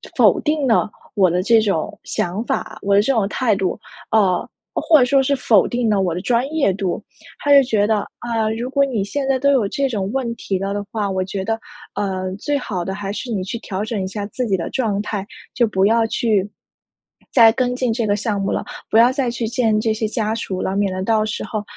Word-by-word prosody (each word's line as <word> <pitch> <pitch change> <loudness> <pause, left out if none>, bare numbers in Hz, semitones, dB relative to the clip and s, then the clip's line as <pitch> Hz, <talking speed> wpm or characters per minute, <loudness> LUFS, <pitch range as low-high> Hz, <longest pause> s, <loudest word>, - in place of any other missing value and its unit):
否 - - +5
定 300 -2 0
了 225 -2 +3 0.3
我 190 -3 +4
的 180 +2 +1
这 225 +2 +5
种 195 -7 -1
想 180 +5 -2
法， - - -3
我 200 0 +2
的 200 - +6
这 250 - +1
种 220 -5 +1
态 230 -4 +1
度， 195 +1 -2 0.3
呃， 195 -5 +2 0.3
或 315 -2 +4
者 250 - +5
说 270 +2 +3
是 280 +2 +1
否 230 -6 +3
定 240 -2 0
了 200 -2 +2
我 180 -3 0
的 180 - -4
专 240 +4 +1
业 290 -10 +2
度。 190 -2 -3 0.4
他 290 - 0
就 280 - +9
觉 215 -5 +1
得： 220 - +2 0.2
“啊， 225 -2 -1
如 240 +2 -3
果 280 +1 +3
你 235 -7 -1
现 275 +6 -3
在 270 -1 +2
都 280 +2 +3
有 225 -7 +2
这 275 +5 -1
种 200 -4 -2
问 245 -3 -2
题 195 -4 -3
了 195 +1 -2
的 205 - -3
话， 210 -3 -1
我 190 -1 -1
觉 190 +1 -4
得， 225 0 -1 0.4
呃， 185 -2 -2
最 290 +6 -1
好 195 -9 -3
的 190 - -3
还 195 0 -4
是 240 +3 -5
你 195 -4 -1
去 210 +5 -4
调 195 -2 -4
整 220 -3 -3
一 - - -3
下 200 +1 -4
自 250 +4 -3
己 195 - +2
的 170 - -4
状 215 -6 -1
态， 205 -2 -4 0.3
就 240 - +3
不 190 -2 +1
要 225 +1 +3
去 215 -4 +1 0.8
再 230 -3 +7
跟 250 0 0
进 250 -2 0
这 230 0 -1
个 205 - +2
项 210 -1 -2
目 195 - -1
了， - - -1 0.3
不 - - +3
要 235 +2 +6
再 260 -2 -1
去 235 -1 -3
见 225 -3 +1
这 220 0 0
些 220 0 -2
家 220 0 -1
属 190 -4 -4
了， 190 - -2
免 200 -1 0
得 185 - -3
到 215 +1 +2
时 215 - -3
候， 215 -2 -4
220 Hz, 260 characters per minute, -20 LUFS, 195-245 Hz, 0.8 s, 就